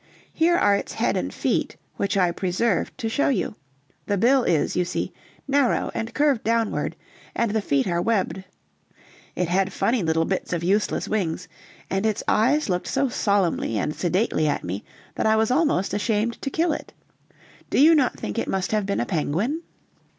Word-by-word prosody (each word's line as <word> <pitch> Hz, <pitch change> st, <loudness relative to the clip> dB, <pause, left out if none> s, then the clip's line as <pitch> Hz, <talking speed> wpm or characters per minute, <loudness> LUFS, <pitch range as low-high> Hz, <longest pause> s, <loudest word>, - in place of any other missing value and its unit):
Here 335 Hz, +2 st, +3 dB
are 205 Hz, -, +4 dB
its -, -, -4 dB
head -, -, 0 dB
and -, -, -2 dB
feet, -, -, -1 dB, 0.2 s
which 200 Hz, 0 st, -1 dB
I 180 Hz, -2 st, +3 dB
preserved 185 Hz, +3 st, -1 dB
to 240 Hz, -4 st, -3 dB
show 255 Hz, +6 st, +1 dB
you; 225 Hz, -8 st, 0 dB, 0.5 s
the 205 Hz, -, +1 dB
bill 255 Hz, +6 st, +4 dB
is, 155 Hz, -8 st, +1 dB
you 180 Hz, -, +2 dB
see, 175 Hz, -, -3 dB, 0.3 s
narrow 275 Hz, -2 st, +2 dB
and 225 Hz, -, -3 dB
curved 290 Hz, -5 st, +2 dB
downward, 230 Hz, -1 st, 0 dB, 0.4 s
and 230 Hz, -3 st, +1 dB
the 220 Hz, 0 st, 0 dB
feet 140 Hz, -8 st, +1 dB
are 175 Hz, -1 st, 0 dB
webbed. 195 Hz, -2 st, 0 dB, 0.9 s
It 180 Hz, -, 0 dB
had 190 Hz, +2 st, +1 dB
funny 230 Hz, +5 st, +1 dB
little 160 Hz, -1 st, +1 dB
bits 190 Hz, 0 st, -2 dB
of 170 Hz, -1 st, -2 dB
useless 200 Hz, +4 st, +1 dB
wings, 185 Hz, -7 st, -2 dB, 0.4 s
and 195 Hz, +1 st, -1 dB
its 220 Hz, -2 st, 0 dB
eyes 275 Hz, +8 st, +3 dB
looked 180 Hz, -2 st, -1 dB
so 275 Hz, -, +1 dB
solemnly 200 Hz, -, +1 dB
and 150 Hz, +9 st, -1 dB
sedately 180 Hz, -2 st, +1 dB
at 145 Hz, -, -1 dB
me 95 Hz, +4 st, -4 dB, 0.3 s
that -, -, 0 dB
I 220 Hz, -, +4 dB
was 220 Hz, +2 st, +2 dB
almost 265 Hz, -, +1 dB
ashamed 220 Hz, +2 st, 0 dB
to 275 Hz, -, -2 dB
kill 325 Hz, +3 st, +1 dB
it. -, -, -7 dB, 0.8 s
Do -, -, +1 dB
you 315 Hz, +4 st, +7 dB
not 285 Hz, -5 st, +2 dB
think 105 Hz, -, -3 dB
it -, -, -2 dB
must 190 Hz, -1 st, -1 dB
have 210 Hz, -2 st, 0 dB
been 200 Hz, -, 0 dB
a -, -, -1 dB
penguin?" 180 Hz, -, -1 dB
205 Hz, 185 wpm, -24 LUFS, 180-235 Hz, 0.9 s, you